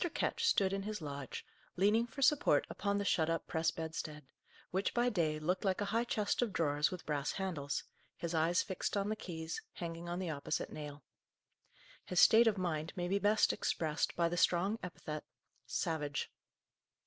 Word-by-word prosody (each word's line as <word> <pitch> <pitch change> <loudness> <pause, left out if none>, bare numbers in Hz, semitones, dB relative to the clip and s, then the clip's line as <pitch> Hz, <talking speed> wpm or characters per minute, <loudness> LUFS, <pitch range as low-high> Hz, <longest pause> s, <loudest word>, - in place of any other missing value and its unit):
Ketch 465 -1 0
stood 195 - +3
in 195 - -1
his 210 +1 -4
lodge, 140 -4 -6 0.3
leaning 210 +6 +3
for 275 +3 -4
support 290 +1 +4
upon 200 0 0
the 200 - -1
shut 165 -4 +2
up 165 0 -1
press 160 0 +1
bedstead, 160 -2 -5 0.5
which, 190 +2 0
by 240 +1 +3
day, 165 -8 +1
looked 175 +5 -1
like 190 -2 +1
a 205 - 0
high 230 +1 +2
chest 210 -2 0
of 240 -4 +1
drawers 150 -4 +2
with 180 -2 -7
brass 145 -2 -1
handles, 165 -8 -2 0.3
his 170 0 -3
eyes 165 +2 +3
fixed 190 +2 -2
on 200 +1 0
the 215 - 0
keys, 165 -5 -5
hanging 170 0 -5
on 175 - -2
the 180 -3 -2
opposite 140 -2 -2
nail. 150 -2 -7 1.0
His 180 - 0
state 230 +1 +8
of 215 -2 +3
mind 165 -3 -2
may 175 -2 -2
be 195 +2 +1
best 210 +1 +4
expressed 155 -1 -1
by 170 -1 +3
the 175 +1 -2
strong 190 +6 +3
epithet, 155 -4 -6 0.4
"savage." 150 -3 -2
175 Hz, 180 wpm, -35 LUFS, 155-200 Hz, 1.0 s, state